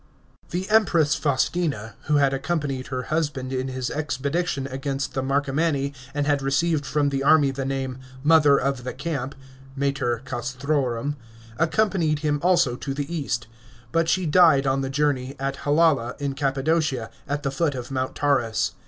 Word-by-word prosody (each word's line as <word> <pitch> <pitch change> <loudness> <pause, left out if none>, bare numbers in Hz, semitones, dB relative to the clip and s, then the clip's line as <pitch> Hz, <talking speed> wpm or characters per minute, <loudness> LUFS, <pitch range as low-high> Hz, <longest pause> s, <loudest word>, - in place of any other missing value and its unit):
§ - - -25
16. 175 - 0
The 215 - +3
Empress 170 -9 +4
Faustina, 140 -5 0
who 150 - +2
had 140 -2 +3
accompanied 135 -2 -2
her 130 -1 -3
husband 145 -5 -1
in 130 0 -1
his 130 -1 -3
expedition 145 0 -2
against 135 +1 -3
the 130 - -1
Marcomanni 140 +1 0 0.2
and 145 -1 0
had 145 -1 +1
received 145 +2 +1
from 145 -2 +1
the 135 -1 -1
army 145 -1 +5
the 135 0 -4
name 135 -1 -3
" 130 0 -17
Mother 150 -3 +6
of 135 -2 -1
the 125 - -5
Camp 140 -2 -3 0.2
" 135 0 -20
(Mater 140 -4 -1
Castrorum), 135 +1 -2 0.4
accompanied 170 -3 +2
him 145 -1 +1
also 175 -9 +3
to 135 +1 -4
the 145 +4 -3
east. 120 -7 -2 0.5
But 165 0 +1
she 185 -1 +2
died 155 -4 +5
on 135 0 +1
the 135 - -2
journey, 140 -2 0
at 135 0 -2
Halala 145 -5 +2
in 140 -1 -2
Cappadocia, 140 -2 0 0.2
at 145 +1 -2
the 135 - -1
foot 145 0 0
of 125 +1 -6
Mount 130 -1 -2
Taurus. 125 -6 +1
140 Hz, 170 wpm, -24 LUFS, 135-150 Hz, 0.5 s, Mother